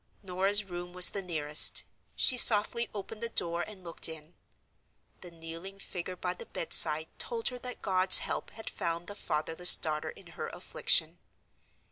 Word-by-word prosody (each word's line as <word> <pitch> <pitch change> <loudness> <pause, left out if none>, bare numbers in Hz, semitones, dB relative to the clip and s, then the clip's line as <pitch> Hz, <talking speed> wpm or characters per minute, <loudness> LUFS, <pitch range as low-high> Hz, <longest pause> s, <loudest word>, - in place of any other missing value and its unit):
Norah's 195 +3 -1
room 175 -2 -11
was 180 -1 +6
the 200 - -6
nearest. 155 -5 +1 0.3
She 255 - +4
softly 235 0 +5
opened 210 +2 -11
the 235 - -5
door 170 -5 -3
and 195 -1 -11
looked 170 -1 -3
in. 160 +1 -12 0.9
The 180 - -13
kneeling 165 +3 -12
figure 185 -2 -9
by 180 0 -6
the - - -14
bedside 155 -1 +2
told 230 -1 -2
her 250 - -11
that 250 0 -10
God's 185 -1 +7
help - - -5
had 220 - -14
found 170 0 -6
the 205 - -10
fatherless 165 -1 +1
daughter 155 -1 -5
in - - -15 0.2
her - - -5
affliction. - - -1
180 Hz, 160 wpm, -27 LUFS, 165-205 Hz, 0.9 s, God's